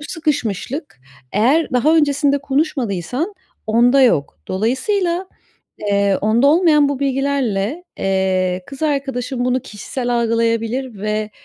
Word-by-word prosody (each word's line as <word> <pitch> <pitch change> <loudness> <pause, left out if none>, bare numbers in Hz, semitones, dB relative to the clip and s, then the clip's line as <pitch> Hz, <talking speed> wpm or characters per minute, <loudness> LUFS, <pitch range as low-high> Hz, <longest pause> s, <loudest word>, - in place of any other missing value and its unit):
bu - - -8
sıkışmışlık 285 - -3 0.3
eğer 260 +9 +2
daha 300 +6 +3
öncesinde 285 -1 +2
konuşmadıysan 275 - -2 0.3
onda 240 +5 +4
yok. 145 - +2
Dolayısıyla, 340 - 0 0.5
eee, 200 -1 +1
onda 225 +6 +3
olmayan 305 -2 +4
bu 280 -2 -2
bilgilerle, 275 - -1
eee, 185 -1 0
kız 275 +2 -10
arkadaşın 270 -4 -1
bunu 250 +1 +1
kişisel 240 +4 -5
algılayabilir 230 0 -1
ve, 215 0 -2
250 Hz, 110 wpm, -19 LUFS, 215-285 Hz, 0.5 s, onda